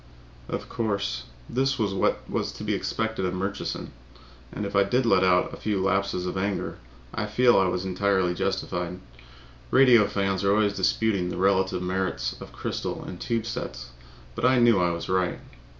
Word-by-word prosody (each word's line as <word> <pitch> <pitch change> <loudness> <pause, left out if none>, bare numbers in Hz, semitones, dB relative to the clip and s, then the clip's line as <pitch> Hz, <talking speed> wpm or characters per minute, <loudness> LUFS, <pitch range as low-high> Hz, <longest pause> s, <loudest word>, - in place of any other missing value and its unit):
Of - - -4
course, 100 - -2 0.2
this 135 +1 0
was 105 -5 0
what 95 - 0
was - - -2
to - - -8
be - - 0
expected 110 -3 -2
of 95 0 -1
Murchison. 95 -6 -4 0.6
And 105 - -4
if 100 - -5
I 100 - +6
did 120 +6 +2
let 95 -5 +4
out 90 -1 +3
a - - -7
few 105 -2 -1
laps 100 +1 +1
of 90 0 -3
anger, 100 +1 -2 0.3
I 105 -1 -2
feel 120 +3 +4
I 95 - +3
was 90 +1 -2
entirely 95 -1 +1
justified. 90 -1 -2 0.7
Radio 120 - +6
fans 95 -1 -1
are 100 0 +4
always 105 -1 +2
disputing 100 0 +1
over - - -4
the - - -6
relative 95 -1 +2
merits 90 -9 -1
of - - -9
crystal - - -4
and - - -8
tube 115 -1 -1
sets, 115 - -5 0.4
but - - -6
I 130 0 +5
knew 120 -4 +5
I 90 - +3
was 85 0 -4
right. 90 -1 0
100 Hz, 180 wpm, -26 LUFS, 90-110 Hz, 0.7 s, I